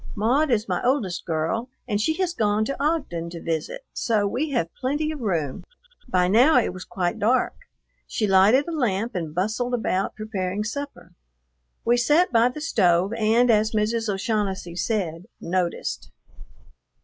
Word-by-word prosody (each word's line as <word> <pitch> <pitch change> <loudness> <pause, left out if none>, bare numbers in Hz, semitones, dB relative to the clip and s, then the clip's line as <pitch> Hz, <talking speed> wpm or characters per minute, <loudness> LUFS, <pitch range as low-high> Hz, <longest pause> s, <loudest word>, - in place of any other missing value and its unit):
Maud 255 +9 +2
is 230 -3 +1
my - - -1
oldest 230 -9 0
girl 170 +10 -1 0.2
and 205 -3 0
she 315 +8 +1
has 365 -1 -1
gone 215 -5 +1
to 275 +3 -3
Ogden 275 - -1
to 170 0 -7
visit, 165 - -3
so 215 -3 +1
we 255 +10 -1
have 170 - -1
plenty 295 +4 -1
of 310 - -6
room." 165 - -2 0.5
By 180 -5 +2
now 245 +10 +5
it 235 - +2
was 185 0 -8
quite 175 -2 -2
dark. 240 +5 +2 0.5
She 215 - -1
lighted 205 - +5
a - - -3
lamp 235 - -1
and 165 -5 -4
bustled 220 +7 0
about, 195 -5 -1
preparing 205 -2 -3
supper. 275 -4 -6 0.7
We 240 +1 +4
sat 300 +9 +3
by 230 +1 +5
the 300 +5 -8
stove 190 - +2
and, 230 +2 +3
as 215 0 +2
Mrs. 220 +1 0
O'Shaughnessy 195 -3 -2
said, 180 -3 -2
"noticed." 175 - -2
215 Hz, 160 wpm, -24 LUFS, 185-250 Hz, 0.7 s, now